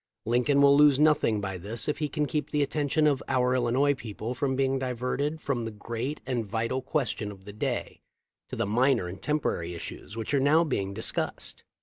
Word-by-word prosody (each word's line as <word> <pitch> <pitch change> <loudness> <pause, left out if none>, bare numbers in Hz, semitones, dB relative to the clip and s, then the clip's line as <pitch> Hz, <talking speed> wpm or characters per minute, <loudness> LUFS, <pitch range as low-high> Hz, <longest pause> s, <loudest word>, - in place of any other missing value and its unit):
Lincoln 125 +5 +3
will 140 0 +7
lose 145 -2 +6
nothing 145 -8 +3
by 95 -2 -4
this 105 +6 -4
if 150 - -1
he 150 -2 -1
can 150 0 0
keep 150 0 -2
the 150 -1 +1
attention 150 +2 +1
of 145 -3 +2
our 125 -1 +2
Illinois 130 +3 +2
people 115 -2 -5
from 130 +1 -1
being 135 0 +1
diverted 130 +4 -2
from 130 -4 -1
the 115 - -3
great 115 +6 -5
and 125 -3 -1
vital 115 +5 -2
question 125 -7 -2
of 95 -1 -14
the 105 - -9
day 105 - -3 0.5
to - - -5
the - - 0
minor 120 -1 +2
and 95 +2 -8
temporary 90 - -1
issues 85 +3 -8
w 115 - -4
r - - -2
hich 125 - -5
are 140 - +4
now 150 +5 +4
being 100 -10 -2
dis 110 - -1
cussed." - - -4
130 Hz, 215 wpm, -28 LUFS, 110-145 Hz, 0.5 s, will